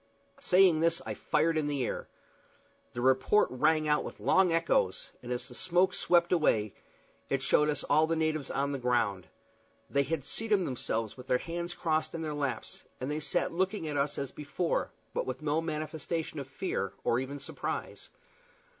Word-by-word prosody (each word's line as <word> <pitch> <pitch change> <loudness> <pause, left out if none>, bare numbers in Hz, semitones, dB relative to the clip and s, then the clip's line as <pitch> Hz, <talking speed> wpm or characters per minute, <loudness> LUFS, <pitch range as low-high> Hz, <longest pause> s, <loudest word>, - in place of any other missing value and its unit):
Saying 180 -3 +5
this 165 +1 +2
I - - -3
fired 160 +1 +1
in 150 - -1
the 140 -4 0
air. - - -4 0.9
The 120 - -4
report 130 +11 +4
rang 155 +5 +2
out 150 0 +2
with - - -8
long 190 -2 +4
echoes, 165 - +1
and 125 - -7
as 125 - -3
the - - -7
smoke 180 +6 +2
swept 175 -1 +3
away 110 - +2 0.6
it 135 -1 0
showed 150 +2 +3
us 145 - +1
all 155 +2 +3
the 165 - +1
natives 155 -3 -1
on 140 +1 -1
the 140 - -3
ground. 115 -8 0 0.6
They 140 - +3
had 145 -1 -2
seated 210 -4 +1
themselves 115 -4 -2
with 125 0 -11
their 125 - +3
hands 170 +4 -4
crossed 160 0 0
on 165 - -4
their 155 -1 -3
laps, 140 -6 -3 0.2
and 130 +3 -3
there 150 - -1
they - - -2
sat 160 +3 0
looking 190 0 -1
at 150 - -3
us 140 +1 0
as 140 -1 -3
before, 150 +4 -2 0.2
but - - -2
with 130 +3 -4
no 155 +2 +1
manifestation 155 0 -3
of 135 - -6
fear 135 - -3
or 120 - +2
even 135 +2 -4
surprise. 140 - -5
150 Hz, 185 wpm, -30 LUFS, 130-165 Hz, 0.9 s, Saying